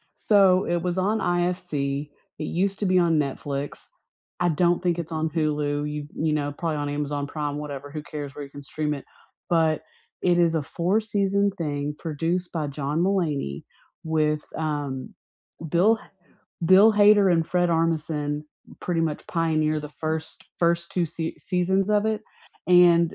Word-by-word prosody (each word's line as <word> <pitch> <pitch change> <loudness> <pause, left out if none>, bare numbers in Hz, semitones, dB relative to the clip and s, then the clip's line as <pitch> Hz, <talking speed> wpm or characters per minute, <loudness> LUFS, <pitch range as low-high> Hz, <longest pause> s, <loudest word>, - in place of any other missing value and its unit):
So, 195 -3 +4
it 175 0 0
was 180 0 -1
on 205 +4 +1
IFC; 175 -5 -1 0.3
It - - -3
used 195 +5 -1
to 205 - +1
be 185 0 +4
on 170 -3 +3
Netflix. 140 0 -3 0.6
I 175 - +3
don't 175 +2 +2
think 175 -2 +1
it's 165 -1 -5
on 160 0 0
Hulu, 150 -2 0
y 150 0 -4
you 155 0 0
know, 145 -1 -1
probably 165 -3 -2
on 145 0 -2
Amazon 145 0 -2
Prime, 145 -1 -3
whatever, 145 -1 -6
who 150 +1 -5
cares 145 -2 -7
where 145 - -6
you 140 - -13
can 145 0 -10
stream 150 +1 -2
it? 140 - -8 0.5
But 160 -2 +2 0.4
it 175 -1 +3
is 170 -1 +3
a 160 - +1
four-season 200 +4 +1
thing 145 -2 -2
produced 165 +3 -2
by 155 -3 -1
John 145 +2 -2
Mulaney 160 - 0 0.4
with, 155 -1 +1 0.2
um 145 -4 -3 0.5
Bill 195 +8 +4
H - - -19 0.6
Bill 195 +5 +7
Hader 205 -2 +6
and 165 -2 +2
Fred 175 0 +1
Armisen 155 -3 0 0.4
pretty 175 -2 -1
much 155 -2 -2
pioneer 155 -2 +1
the 150 - -7
first 160 +1 -4
first 170 0 +1
2 175 -2 +1
sea 165 +1 -4
seasons 190 +2 0
of 210 0 +3
it, 220 0 -1 0.5
and 175 -2 +6
160 Hz, 165 wpm, -25 LUFS, 150-180 Hz, 0.6 s, Bill